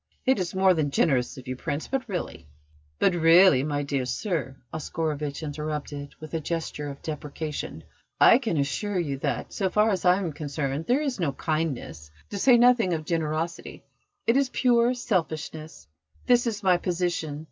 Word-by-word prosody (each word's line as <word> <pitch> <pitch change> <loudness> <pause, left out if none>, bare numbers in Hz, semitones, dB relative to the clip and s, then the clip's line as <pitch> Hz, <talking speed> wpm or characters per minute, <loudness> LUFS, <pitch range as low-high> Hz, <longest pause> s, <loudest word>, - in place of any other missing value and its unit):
"It 260 -3 +3
is 180 0 -3
more 190 0 +5
than 155 -4 0
generous 135 -4 +1
of 130 0 -11
you, 130 - -3
Prince, 145 +4 -4
but 265 -2 -3
really 170 - -5 0.3
" 75 0 -34
"But 190 - +3
really, 170 -3 +6
my 145 0 -1
dear 140 -2 -1
sir," 135 - -2 0.2
Oscarovitch 150 -1 -3
interrupted, 150 -1 -5
with 155 0 -10
a 165 - 0
gesture 155 -2 -4
of 140 - -10
deprecation, 150 0 -5 0.4
"I 235 - +7
can 225 - -1
assure 185 +8 -1
you 145 -6 -2
that, 135 -4 -3
so 190 -2 0
far 210 +3 +3
as 190 - -1
I 180 0 +5
am 180 -6 -3
concerned, 145 0 -3
there 265 +5 +2
is 270 -7 -2
no 155 -6 0
kindness, 140 - -3 0.2
to 200 - -4
say 250 +3 +6
nothing 235 -6 +4
of 155 -1 -5
generosity. 160 0 -3 0.4
It 230 - +3
is 275 -2 +2
pure 245 -1 +3
selfishness. 160 - -3 0.4
This 245 -1 +4
is 210 -2 -3
my 185 -2 +4
position. 175 -4 -2
160 Hz, 175 wpm, -26 LUFS, 145-190 Hz, 0.4 s, I